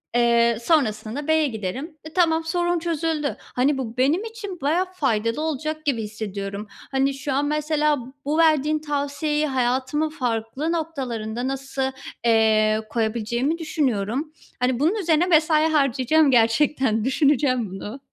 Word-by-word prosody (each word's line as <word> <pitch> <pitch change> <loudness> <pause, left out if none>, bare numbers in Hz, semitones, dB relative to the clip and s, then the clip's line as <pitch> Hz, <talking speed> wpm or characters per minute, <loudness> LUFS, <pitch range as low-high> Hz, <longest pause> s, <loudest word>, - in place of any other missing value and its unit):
eee, 235 -1 +3
sonrasında 235 -8 +1
da 290 - -7
B'ye 315 -1 +3
giderim. 255 - -5
E, 315 0 -10
tamam, 330 -3 +2
sorun 345 +1 0
çözüldü. 320 -3 -2
Hani, 270 +3 0
bu 245 -2 -5
benim 290 +10 +2
için 445 -6 -7
bayağı 320 +7 +1
faydalı 230 -6 0
olacak 310 0 -3
gibi 250 -6 0
hissediyorum. 205 -1 -5 0.2
Hani, 270 +1 +1
şu 275 +1 -4
an 280 +2 +1
mesela 300 0 +1 0.3
bu 295 +2 0
verdiğin 310 -2 +3
tavsiyeyi 295 +1 -1
hayatımın 260 +3 0
farklı 250 +1 -2
noktalarında 255 -8 -3
nasıl, 270 0 -2 0.3
eee, 220 -1 +3
koyabileceğimi 235 +6 -1
düşünüyorum. 285 - -1 0.3
Hani, 250 0 +1
bunun 320 +9 +2
üzerine 340 -5 +2
mesai 315 -2 +4
harcayacağım 280 +1 +3
gerçekten. 230 -1 +2
Düşüneceğim 260 - +2
bunu. 205 +7 -7
275 Hz, 130 wpm, -23 LUFS, 235-310 Hz, 0.3 s, mesai